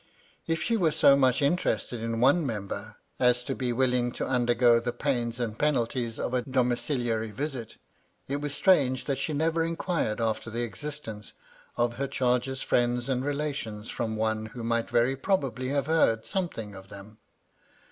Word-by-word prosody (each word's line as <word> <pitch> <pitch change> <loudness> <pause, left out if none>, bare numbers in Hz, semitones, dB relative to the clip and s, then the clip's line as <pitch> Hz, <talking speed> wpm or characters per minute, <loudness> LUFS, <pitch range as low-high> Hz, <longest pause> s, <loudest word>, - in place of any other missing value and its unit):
K 165 - +2
she 230 +7 0
were 175 -6 +3
so 150 -2 +5
much 130 0 +3
interested 140 -6 0
in 115 0 -2
one 140 +8 +4
member 105 -3 -4 0.2
as 125 0 +3
to 135 - -3
be 125 -2 -2
will 125 +1 +2
ing 120 -1 +1
to - - -3
undergo 120 -1 +4
the 120 +1 -2
pains 120 -2 -1
and 115 -2 -3
penalties 120 -5 0
of - - -3
a 125 - +2
domiciliary 120 -3 0
visit, 125 0 -5 0.5
it 140 - -1
was 145 0 -3
strange 135 -9 +3
that 135 -2 -1
she 155 - -1
never 160 +2 +1
inquired 165 - -1
after 115 0 -1
the 120 +2 -2
existence 120 -4 -6 0.4
of 120 0 +1
her 140 +1 -1
charge's 125 +1 0
friends 120 +1 +1
and 130 -1 0
relations 140 -7 -3
from 110 -1 -2
one 110 0 -1
who 115 +2 -8
might 115 0 0
very 120 +3 +2
probably 135 - -1
have 140 -1 0
heard 140 -8 +2
something 170 - -3
of 95 0 -12
them. 100 +2 -12
125 Hz, 170 wpm, -28 LUFS, 115-140 Hz, 0.5 s, so